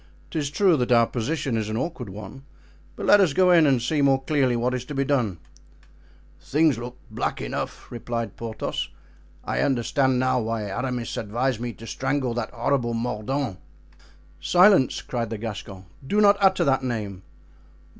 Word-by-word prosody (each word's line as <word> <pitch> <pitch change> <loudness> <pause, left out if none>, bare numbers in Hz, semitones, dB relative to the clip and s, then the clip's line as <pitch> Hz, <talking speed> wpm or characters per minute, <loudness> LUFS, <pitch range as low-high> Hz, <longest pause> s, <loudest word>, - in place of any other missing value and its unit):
"'Tis 150 -3 -2
true 185 +3 +3
that 125 -1 -1
our 115 -1 +6
position 130 +2 -2
is 110 -1 -2
an 110 - -2
awkward 130 - -4
one; 105 +6 -9 0.5
but - - -5
let 205 - +7
us 175 -7 +3
go 185 +3 +4
in 165 -3 +6
and 130 -4 +2
see 145 +4 0
more 135 -1 +4
clearly 135 -4 +1
what 120 +2 0
is 125 -1 -2
to 145 +3 -7
be 135 - +1
done." 120 -10 0 1.0
"Things 150 -4 +2
look 120 +1 -7
black - - -2
enough," - - -5
replied 115 -3 -4
Porthos; 115 -1 -4 0.5
"I - - -2
understand 130 0 +1
now 130 0 +2
why 115 -1 -2
Aramis 120 +4 -3
advised 115 +3 -1
me 120 0 -3
to 115 - -12
strangle 130 +1 -1
that 120 -1 -3
horrible 120 -1 -1
Mordaunt." 115 -1 -2 0.8
"Silence!" 180 -7 +4
cried 120 -3 -3
the 110 - -4
Gascon; 105 -3 -7 0.2
"do 205 - +1
not 205 -1 +6
utter 190 -2 +4
that 135 -3 +2
name." 105 -7 -4
125 Hz, 165 wpm, -24 LUFS, 115-140 Hz, 1.0 s, let